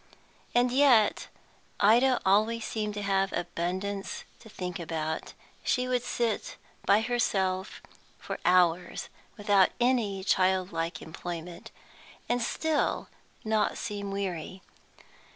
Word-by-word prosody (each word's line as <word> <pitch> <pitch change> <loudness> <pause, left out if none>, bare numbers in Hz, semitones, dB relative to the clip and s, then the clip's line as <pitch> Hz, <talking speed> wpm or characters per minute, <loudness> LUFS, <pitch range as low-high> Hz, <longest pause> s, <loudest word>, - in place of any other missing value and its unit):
And 245 0 +4
yet 255 -5 +4 0.5
Ida 240 +5 +5
always 215 +4 +3
seemed 210 -2 -3
to 205 - -4
have 195 -1 +1
abundance 185 +3 -3 0.2
to 220 - -14
think 180 -4 -5
about; 160 -1 -3 0.3
she 250 -1 +1
would 250 -1 +1
sit 235 -2 -2 0.3
by 210 - +5
herself 195 -5 -1 0.3
for - - -6
hours, 180 -1 +2 0.3
without 205 -3 +4
any 235 -6 +1
childlike 185 -3 +1
employment, 170 +1 -7 0.6
and 245 0 0
still 310 +6 0 0.4
not 215 0 +1
seem 205 -2 -4
weary. 190 -2 -4
200 Hz, 105 wpm, -29 LUFS, 180-230 Hz, 0.6 s, Ida